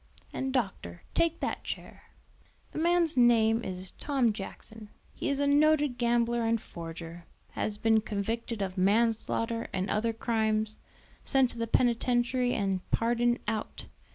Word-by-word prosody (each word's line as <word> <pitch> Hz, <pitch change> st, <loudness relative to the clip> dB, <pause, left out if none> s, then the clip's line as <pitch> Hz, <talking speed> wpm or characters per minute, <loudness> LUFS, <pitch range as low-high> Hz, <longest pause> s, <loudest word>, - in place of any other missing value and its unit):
"And 265 Hz, 0 st, -2 dB
doctor, 195 Hz, -, -3 dB
take 335 Hz, 0 st, +1 dB
that -, -, -2 dB
chair. -, -, -7 dB, 0.7 s
"The -, -, -4 dB
man's 340 Hz, -1 st, +2 dB
name 230 Hz, -2 st, +4 dB
is 185 Hz, 0 st, -5 dB
Tom 265 Hz, -6 st, +1 dB
Jackson; 215 Hz, +2 st, -9 dB, 0.2 s
he -, -, -3 dB
is 280 Hz, 0 st, 0 dB
a 285 Hz, -, +2 dB
noted 290 Hz, -2 st, +3 dB
gambler 235 Hz, 0 st, +2 dB
and 230 Hz, 0 st, +1 dB
forger, 165 Hz, -1 st, -9 dB, 0.3 s
has 210 Hz, -1 st, -3 dB
been 220 Hz, 0 st, +3 dB
convicted 220 Hz, +1 st, -3 dB
of 185 Hz, 0 st, -4 dB
manslaughter 230 Hz, +3 st, +1 dB
and 190 Hz, 0 st, -2 dB
other 230 Hz, +2 st, +1 dB
crimes, 220 Hz, -1 st, 0 dB, 0.4 s
sent 265 Hz, -2 st, +3 dB
to 235 Hz, -, -8 dB
the 230 Hz, -, -1 dB
penitentiary 245 Hz, +1 st, +2 dB
and 195 Hz, -3 st, 0 dB
pardoned 240 Hz, +1 st, +1 dB
out. 220 Hz, -2 st, -3 dB
230 Hz, 140 wpm, -29 LUFS, 210-245 Hz, 0.7 s, name